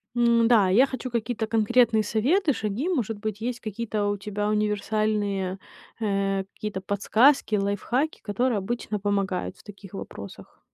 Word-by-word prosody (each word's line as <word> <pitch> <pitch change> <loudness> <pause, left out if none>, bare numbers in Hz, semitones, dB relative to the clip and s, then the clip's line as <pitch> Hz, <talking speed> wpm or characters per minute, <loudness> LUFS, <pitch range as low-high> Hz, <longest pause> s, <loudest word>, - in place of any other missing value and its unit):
Н-да, 235 -4 +4
я 225 +9 +6
хочу 260 -2 -6
какие-то 235 -1 -2
конкретные 225 0 +3
советы, 280 - +2
шаги. 225 - -2
Может 225 - -1
быть, 215 0 -4
есть 240 +1 -3
какие-то 215 -1 -3
у 205 0 0
тебя 205 +1 -3
универсальные, 210 -2 0 0.4
э, 195 -2 0
какие-то 210 -3 -5
подсказки, 220 +5 +3
лайфхаки, 205 +9 -1
которые 230 +3 0
обычно 210 +1 -3
помогают 195 -2 -1
в - - -18
таких 200 -2 -12
вопросах. 100 - -9
215 Hz, 135 wpm, -25 LUFS, 200-235 Hz, 0.4 s, я